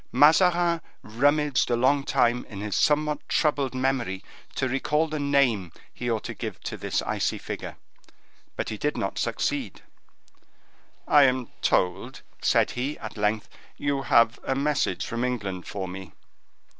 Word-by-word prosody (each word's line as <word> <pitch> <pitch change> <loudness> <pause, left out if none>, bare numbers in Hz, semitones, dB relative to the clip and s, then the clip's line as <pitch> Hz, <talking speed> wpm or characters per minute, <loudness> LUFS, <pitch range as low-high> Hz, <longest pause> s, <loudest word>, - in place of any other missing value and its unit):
Mazarin 170 +2 +4 0.2
rummaged 145 +3 +2
a 120 - +3
long 135 +4 +3
time 125 -3 +2
in 100 - -8
his 105 -1 -3
somewhat 150 0 +2
troubled 140 -4 +1
memory 130 -7 -1 0.3
to 130 - 0
recall 150 +5 +1
the 155 -1 -4
name 135 - +2 0.2
he 120 - -4
ought 110 -2 -1
to - - -5
give - - -6
to - - -4
this - - -2
icy - - -1
figure, - - -6 0.8
but - - -3
he 110 - -5
did 150 - -1
not 95 - -2
succeed. - - -2 1.2
"I 145 -1 +7
am 130 -2 0
told," 90 -1 0 0.2
said - - +3
he, 135 +5 -3
at 110 - -8
length, 105 0 0 0.3
"you 140 -1 -1
have 115 -2 +3
a 135 - -1
message 140 -10 0
from 115 +1 -3
England 100 -8 -3
for 95 -2 -4
me." 90 -2 -8
130 Hz, 150 wpm, -26 LUFS, 110-145 Hz, 1.2 s, I